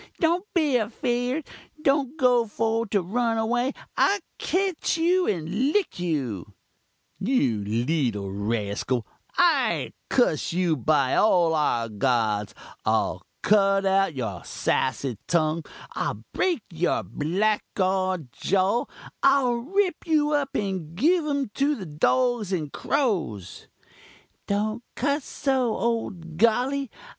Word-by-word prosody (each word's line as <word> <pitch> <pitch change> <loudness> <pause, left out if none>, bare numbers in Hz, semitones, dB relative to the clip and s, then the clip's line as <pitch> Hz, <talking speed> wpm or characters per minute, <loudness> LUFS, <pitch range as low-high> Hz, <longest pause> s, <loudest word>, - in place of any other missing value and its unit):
don't 345 +3 +2
be 300 -7 +3
afeerd! 245 +5 -1 0.3
don't 280 -1 +1
go 250 -4 +3
for 225 +2 -1
to 200 -2 0
run 230 +5 0
away! 240 +4 +1 0.2
I'll 400 - +3 0.2
ketch 375 -3 0
you 355 +3 +2
and 195 - 0
lick 415 - 0
you 130 - -3 0.3
' - - -45
"'You 190 - +1
leetul 115 -2 -1
raskul 105 +3 -1 0.3
I'll 350 -1 +3 0.2
kuss 205 - +2
you 175 -2 +2
by 140 0 +2
all 175 -6 +4
our 135 -7 +1
gods 110 -2 0 0.3
I'll - - 0 0.2
cut 195 -1 +4
out 195 -4 +2
your 110 -9 -4
sassy 130 -3 -1
tung 160 -1 +1 0.3
I'll - - -3
break 350 - 0
your 170 +1 0
blackguard 185 - -1
jaw 195 +5 +1 0.4
I'll 270 -3 +4
rip 355 +11 -1
you 305 -2 +2
up 285 -2 0
and 185 -6 -3
give 315 - +2
um 280 -6 -1
to 285 +4 +1
the 195 - -7
dogs 220 +7 +1
and 155 -6 -2
crows 170 - -2
' - - -46 0.7
"'Don't 215 +3 -1
cuss 285 0 0
so, 260 -5 0
ole 230 -1 0
Golly! 230 - 0
205 Hz, 120 wpm, -25 LUFS, -, 0.7 s, all